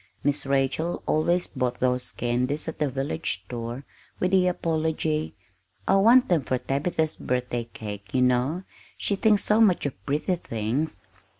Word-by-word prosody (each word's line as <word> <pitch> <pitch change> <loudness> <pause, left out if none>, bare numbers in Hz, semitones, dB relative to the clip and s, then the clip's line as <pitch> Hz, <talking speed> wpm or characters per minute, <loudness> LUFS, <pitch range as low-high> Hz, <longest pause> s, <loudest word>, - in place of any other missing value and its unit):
Miss 145 -1 +1
Rachel 140 +5 0
always 175 +3 +2
bought 125 -3 -2
those 125 0 +1
candies 125 +6 -1
at 160 - -5
the 150 -2 +1
village 135 -5 -3
store, 120 +3 -5 0.4
with 180 - +1
the 185 -1 +4
apology: 160 -4 -1 0.5
"I 195 - +5
want 235 +6 +6
them 170 -4 +3
for 130 -1 -1
Tabitha's 155 +4 -1
birthday 125 -2 -2
cake, 105 -2 -8
you 130 - +2
know. 125 +8 +1 0.3
She 200 - 0
thinks 210 0 +3
so 215 +2 +3
much 190 -8 +4
of 125 -9 -5
pretty 155 +6 0
things." 115 +1 -2
145 Hz, 155 wpm, -26 LUFS, 125-170 Hz, 0.5 s, want